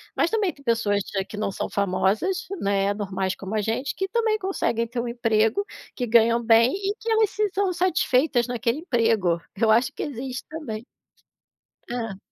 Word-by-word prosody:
Mas -, -, +2 dB
também 425 Hz, -5 st, 0 dB
tem 280 Hz, -, -19 dB
pessoas 225 Hz, -4 st, +1 dB, 0.3 s
que -, -, -8 dB
não 210 Hz, -2 st, -1 dB
são -, -, -3 dB
famosas, 205 Hz, -, 0 dB, 0.2 s
né, 200 Hz, 0 st, +1 dB
normais 190 Hz, -2 st, -2 dB
como 195 Hz, +2 st, -6 dB
a 215 Hz, -, +1 dB
gente, 225 Hz, +6 st, -2 dB
que 385 Hz, -, -2 dB
também 445 Hz, -1 st, +1 dB
conseguem 375 Hz, -, -1 dB
ter 240 Hz, 0 st, -4 dB
um 240 Hz, -, -2 dB
emprego, 230 Hz, -, +1 dB, 0.3 s
que 245 Hz, -, -2 dB
ganham 235 Hz, +1 st, +4 dB
bem 230 Hz, +2 st, +5 dB
e 400 Hz, +1 st, -2 dB
que 460 Hz, -, -4 dB
elas 440 Hz, -2 st, +3 dB
se 420 Hz, -1 st, 0 dB
são 385 Hz, -2 st, +1 dB
satisfeitas 320 Hz, -8 st, +2 dB
naquele 245 Hz, +2 st, -1 dB
emprego. 225 Hz, -, +1 dB, 0.2 s
Eu 220 Hz, +1 st, +3 dB
acho 240 Hz, +4 st, +3 dB
que -, -, -5 dB
existe 255 Hz, -2 st, -5 dB
também. 240 Hz, -9 st, -6 dB, 1.1 s
Hã? 225 Hz, -5 st, -4 dB
235 Hz, 175 wpm, -24 LUFS, 215-355 Hz, 1.1 s, bem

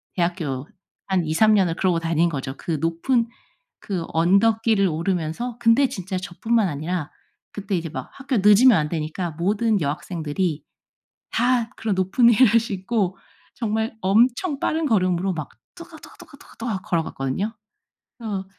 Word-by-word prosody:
대학교 165 Hz, -7 st, -2 dB, 0.4 s
한 185 Hz, -4 st, +1 dB
2-3 215 Hz, +8 st, +3 dB
년을 180 Hz, -4 st, +2 dB
그러고 180 Hz, -3 st, +1 dB
다닌 165 Hz, +1 st, +1 dB
거죠, 135 Hz, -2 st, -5 dB
그 165 Hz, -4 st, -3 dB
높은 230 Hz, +9 st, +1 dB, 0.5 s
그 185 Hz, -5 st, -4 dB
언덕길을 200 Hz, +4 st, +3 dB
오르면서. 175 Hz, +7 st, -2 dB
근데 240 Hz, +4 st, +4 dB
진짜 185 Hz, 0 st, -4 dB
저뿐만 200 Hz, +4 st, 0 dB
아니라 155 Hz, +2 st, -3 dB, 0.4 s
그때 200 Hz, -1 st, -3 dB
이제 165 Hz, -1 st, -4 dB
막 -, -, -7 dB
학교 270 Hz, -3 st, -2 dB
늦으면 210 Hz, +3 st, +6 dB
안 150 Hz, -1 st, 0 dB
되니까 160 Hz, +2 st, -3 dB
모든 205 Hz, +6 st, 0 dB
여학생들이 155 Hz, +1 st, -2 dB, 0.7 s
다 240 Hz, -1 st, +1 dB
그런 215 Hz, -4 st, -1 dB
높은 195 Hz, +6 st, +4 dB
힐을 230 Hz, -1 st, +5 dB
신고 195 Hz, -2 st, -2 dB, 0.4 s
정말 220 Hz, 0 st, -2 dB
엄청 245 Hz, -, +2 dB
빠른 320 Hz, 0 st, 0 dB
걸음으로 185 Hz, -5 st, +1 dB
막 155 Hz, -4 st, -5 dB, 0.3 s
또각또각 340 Hz, -2 st, -13 dB
또각또각 285 Hz, +1 st, -16 dB
또각 220 Hz, -5 st, -3 dB
걸어갔거든요. 165 Hz, -, -2 dB, 0.7 s
어 200 Hz, -3 st, -3 dB
190 Hz, 300 characters per minute, -23 LUFS, 165-225 Hz, 0.7 s, 늦으면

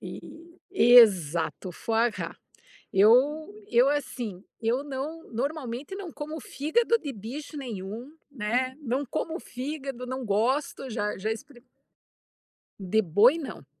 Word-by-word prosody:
E -, -, -7 dB, 0.5 s
e 245 Hz, -11 st, +4 dB
exato, 180 Hz, -4 st, +3 dB
foie 225 Hz, +6 st, +1 dB
gras. -, -, -6 dB, 0.6 s
Eu 265 Hz, -, +4 dB, 0.2 s
eu 245 Hz, +4 st, +5 dB
assim, 240 Hz, -9 st, -3 dB, 0.2 s
eu 235 Hz, +4 st, +1 dB
não 290 Hz, +4 st, -5 dB
normalmente 265 Hz, +2 st, -3 dB
não 385 Hz, -4 st, -6 dB
como 310 Hz, +2 st, -6 dB
fígado 445 Hz, -, +1 dB
de 290 Hz, -8 st, -5 dB
bicho 260 Hz, +9 st, -7 dB
nenhum, 230 Hz, +1 st, -6 dB, 0.2 s
né, 255 Hz, +2 st, -1 dB
não 265 Hz, +1 st, -1 dB
como 325 Hz, +6 st, -3 dB
fígado, 270 Hz, -1 st, -5 dB
não 260 Hz, 0 st, -4 dB
gosto, 255 Hz, +6 st, 0 dB
já 210 Hz, -3 st, -2 dB
já 215 Hz, +3 st, -2 dB
experi 240 Hz, +3 st, -8 dB, 1.2 s
De 200 Hz, +3 st, +2 dB
boi 215 Hz, -, +5 dB
não, 280 Hz, -, -7 dB
255 Hz, 125 wpm, -27 LUFS, 220-290 Hz, 1.2 s, eu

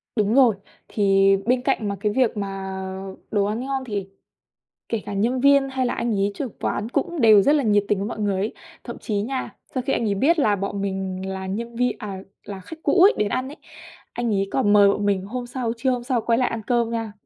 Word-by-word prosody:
Đúng 215 Hz, 0 st, +1 dB
rồi, 250 Hz, -6 st, +5 dB, 0.3 s
thì 195 Hz, -2 st, +3 dB, 0.2 s
bên 250 Hz, +1 st, +2 dB
cạnh 250 Hz, -5 st, 0 dB
mà 200 Hz, -, -2 dB
cái 210 Hz, +1 st, 0 dB
việc 230 Hz, -1 st, +1 dB
mà 195 Hz, -1 st, -4 dB, 0.5 s
đồ 205 Hz, -2 st, +2 dB
ăn 210 Hz, +3 st, -2 dB
ngon 270 Hz, -1 st, -2 dB
thì 200 Hz, -4 st, -4 dB, 0.8 s
kể 225 Hz, -3 st, -2 dB
cả 205 Hz, -, -5 dB
nhân 235 Hz, +6 st, 0 dB
viên 280 Hz, 0 st, +5 dB
hay 265 Hz, -1 st, -1 dB
là -, -, -1 dB
anh 235 Hz, -1 st, -1 dB
ấy 200 Hz, +1 st, +1 dB
trưởng 245 Hz, +1 st, -5 dB
quán 210 Hz, -, -2 dB
cũng 295 Hz, +5 st, -2 dB
đều 215 Hz, -4 st, +7 dB
rất 290 Hz, -, +4 dB
là 295 Hz, -, +2 dB
nhiệt 205 Hz, -3 st, +3 dB
tình 205 Hz, -, +1 dB
với 200 Hz, +2 st, -2 dB
mọi 235 Hz, -, -6 dB
người 205 Hz, -2 st, 0 dB
ấy. 210 Hz, +3 st, -2 dB, 0.3 s
Thậm 235 Hz, -, -7 dB
chí 215 Hz, -, -4 dB
nha, 260 Hz, +4 st, -4 dB, 0.2 s
sau 255 Hz, -, -1 dB
khi -, -, +1 dB
anh 235 Hz, -, 0 dB
ấy 200 Hz, -, +1 dB
biết 305 Hz, -, +2 dB
là 215 Hz, -8 st, +3 dB
bọn 200 Hz, +1 st, -3 dB
mình 190 Hz, -1 st, -3 dB
là 190 Hz, 0 st, -5 dB
nhân 230 Hz, +5 st, -5 dB
vi 250 Hz, +1 st, +2 dB
à, 195 Hz, -4 st, -6 dB, 0.2 s
là 195 Hz, -2 st, -7 dB
khách 325 Hz, -, -10 dB
cũ 370 Hz, -, +3 dB
ấy 395 Hz, -, +7 dB
đến 210 Hz, -, +1 dB
ăn 255 Hz, +5 st, -2 dB
ấy, 295 Hz, -, -10 dB, 0.6 s
anh 240 Hz, -1 st, -2 dB
ấy 195 Hz, 0 st, 0 dB
còn 205 Hz, -6 st, +2 dB
mời 205 Hz, -1 st, +7 dB
bọn 205 Hz, +1 st, 0 dB
mình 195 Hz, -2 st, +1 dB
hôm 245 Hz, +4 st, -5 dB
sau, 240 Hz, -2 st, -3 dB
trưa 260 Hz, +3 st, 0 dB
hôm 250 Hz, -1 st, -1 dB
sau 245 Hz, -1 st, 0 dB
quay 230 Hz, +1 st, +1 dB
lại 255 Hz, -, +2 dB
ăn 230 Hz, -1 st, -4 dB
cơm 235 Hz, -2 st, +1 dB
nha. 225 Hz, -2 st, -3 dB
220 Hz, 245 wpm, -23 LUFS, 200-250 Hz, 0.8 s, đều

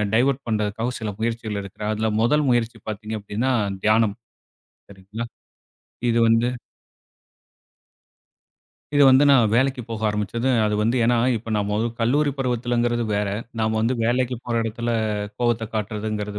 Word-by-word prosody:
Divert 135 Hz, +3 st, +2 dB
பண்றதுக்காகவும் 110 Hz, +3 st, -1 dB
சில 110 Hz, -, -2 dB
முயற்சிகள் 115 Hz, -2 st, -2 dB
எடுக்குறன். 105 Hz, +2 st, -5 dB
அதுல 110 Hz, +1 st, -1 dB
முதல் 150 Hz, +6 st, +3 dB
முயற்சி 120 Hz, -1 st, 0 dB
பாத்தீங்க 110 Hz, +1 st, -5 dB
அப்படின்னா 110 Hz, +6 st, -1 dB, 0.3 s
தியானம். 110 Hz, -1 st, +3 dB, 0.8 s
சரிங்களா. 100 Hz, +4 st, -7 dB, 0.9 s
இது 115 Hz, 0 st, +2 dB
வந்து 115 Hz, +2 st, +3 dB, 2.5 s
இது 145 Hz, -, +5 dB
வந்து 130 Hz, +2 st, +6 dB
நான் 120 Hz, -6 st, +4 dB
வேலைக்கு 130 Hz, +1 st, +1 dB
போக 110 Hz, -1 st, -4 dB
ஆரம்பிச்சது, 105 Hz, +4 st, -1 dB, 0.2 s
அது 105 Hz, 0 st, +1 dB
வந்து, 115 Hz, +4 st, +1 dB
ஏனா, 120 Hz, +1 st, +3 dB, 0.2 s
இப்ப 115 Hz, +1 st, -7 dB
நாம, 105 Hz, 0 st, -1 dB, 0.2 s
கல்லூரி 145 Hz, +6 st, +2 dB
பருவத்தில்ங்கிறது 120 Hz, -2 st, 0 dB
வேற. 100 Hz, 0 st, 0 dB, 0.3 s
நாம 110 Hz, 0 st, 0 dB
வந்து 115 Hz, +3 st, +1 dB
வேலைக்கு 125 Hz, +2 st, +1 dB
போற 120 Hz, -, -3 dB
இடத்தில 115 Hz, +2 st, -3 dB, 0.5 s
கோவத்த 120 Hz, -2 st, 0 dB
காட்றது, 105 Hz, -1 st, -3 dB
115 Hz, 130 wpm, -23 LUFS, 105-120 Hz, 2.5 s, வந்து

